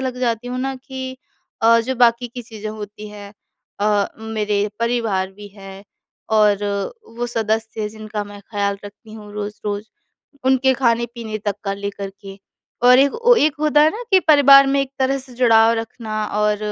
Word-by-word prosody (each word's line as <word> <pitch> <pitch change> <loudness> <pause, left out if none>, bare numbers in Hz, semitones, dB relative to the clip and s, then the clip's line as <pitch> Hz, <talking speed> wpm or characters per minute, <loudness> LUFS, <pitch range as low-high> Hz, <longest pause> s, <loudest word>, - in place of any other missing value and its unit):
लग 255 -1 -3
जाती 240 -1 -1
हूँ 250 +1 -4
ना 270 +1 -2
कि 260 0 -7 0.5
अ, 230 +1 +6
जो 255 +3 -3
बाकी 240 0 +3
की 245 +1 -8
चीज़ें 220 -2 -8
होती 210 0 -8
हैं 205 -1 -11 0.5
अ, 205 -1 +2
मेरे 210 -2 -1
परिवार 225 -5 0
भी 205 +1 -11
है 195 0 -11 0.5
और 210 -2 +4 0.5
वो 240 0 -2
सदस्य 220 -1 -2
हैं 210 - -2
जिनका 215 0 -6
मैं 205 0 -11
ख़याल 200 -2 -1
रखती 205 +2 -12
हूँ 210 -1 -11
रोज-रोज, 205 0 -4 0.6
उनके 265 0 +3
खाने-पीने 235 -3 -1
तक 205 -1 -2
का 195 - -1
लेकर 200 0 -5
के 195 0 -10 0.5
और 250 +1 +8
एक 280 +1 +4
वो - - +7
एक 300 -5 +3
होता 300 -1 +3
है 310 - +5
ना 445 +8 -6
कि 380 -1 +6
परिवार 280 -4 +7
में 275 +1 +2
एक 275 -1 -3
तरह 270 +1 +1
से 260 -1 -13
जुड़ाव 230 -2 +5
रखना 220 -1 -4
और 210 0 +1
225 Hz, 175 wpm, -20 LUFS, 210-255 Hz, 0.6 s, और